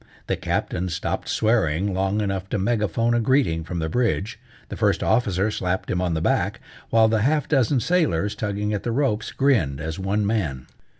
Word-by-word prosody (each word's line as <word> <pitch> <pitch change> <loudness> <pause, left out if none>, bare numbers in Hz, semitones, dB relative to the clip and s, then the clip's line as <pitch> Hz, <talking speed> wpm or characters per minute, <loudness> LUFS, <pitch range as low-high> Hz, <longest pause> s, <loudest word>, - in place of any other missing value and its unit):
The - - 0
Captain 90 +1 -2
stopped 85 0 -3
swearing 100 -4 +1
long 95 +3 0
enough 95 -2 -3
to - - -1
megaphone 115 +2 +1
a 120 - +2
greeting 115 - +2
from 85 +2 -5
the 80 -1 -1
bridge, 115 +1 -1 0.3
the - - -5
First - - +1
Officer 105 -3 +1
slapped 90 -2 -2
him 90 - 0
on 90 -2 0
the 80 - -1
back, - - 0 0.3
while 110 -1 +5
the 110 -1 +1
half 145 +4 +1
dozen 135 -2 +2
sailors, 115 - +1
tugging 105 0 -2
at 100 - -2
the 120 - -2
ropes, 115 -4 0
grinned 110 - +1
as 80 +3 -5
one 100 +2 0
man. 80 - -1
105 Hz, 185 wpm, -23 LUFS, 90-115 Hz, 0.3 s, while